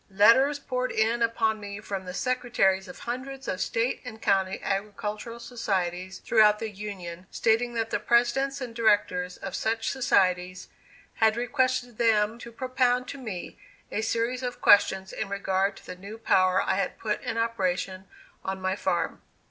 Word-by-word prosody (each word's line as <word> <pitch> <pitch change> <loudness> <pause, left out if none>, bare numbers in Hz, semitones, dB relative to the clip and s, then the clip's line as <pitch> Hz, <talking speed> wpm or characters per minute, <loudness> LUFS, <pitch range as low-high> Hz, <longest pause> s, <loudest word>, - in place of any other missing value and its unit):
Letters 230 +9 +5
poured 255 -2 -2
in 225 +2 +1
upon 225 -1 +1
me 200 0 -7
from 195 -3 -5
the 180 - -6
secretaries 215 -6 +1
of 180 - -10
hundreds 265 +3 -5
of 185 - -2
State 230 +2 0
and 235 -4 -8
County 190 -2 +1
agricultural 210 +3 -3
societies 190 -6 -2
throughout 210 -2 +4
the 220 0 -4
Union, 185 -3 -7
stating 235 +2 +1
that 225 -1 -1
the - - 0
presidents 265 +4 +2
and 245 -2 -5
directors 205 -5 +1
of 195 - -7
such 225 0 -1
societies 185 -7 +1 0.5
had 220 0 +3
requested 250 -1 0
them 220 -1 +2
to 235 - -9
propound 255 0 +1
to 280 - -7
me 210 -9 -7 0.3
a 215 - -1
series 235 +3 -1
of 245 -1 -4
questions 190 -1 +4
in - - -4
regard 195 0 0
to - - -15
the 180 - -7
new 200 +4 -9
power 185 -4 +3
I 190 - 0
had 195 - -1
put 210 -1 -2
in 225 - -3
operation 190 -4 -1 0.4
on 190 0 -3
my 190 0 -1
farm. - - -1
220 Hz, 165 wpm, -27 LUFS, 190-240 Hz, 0.5 s, Letters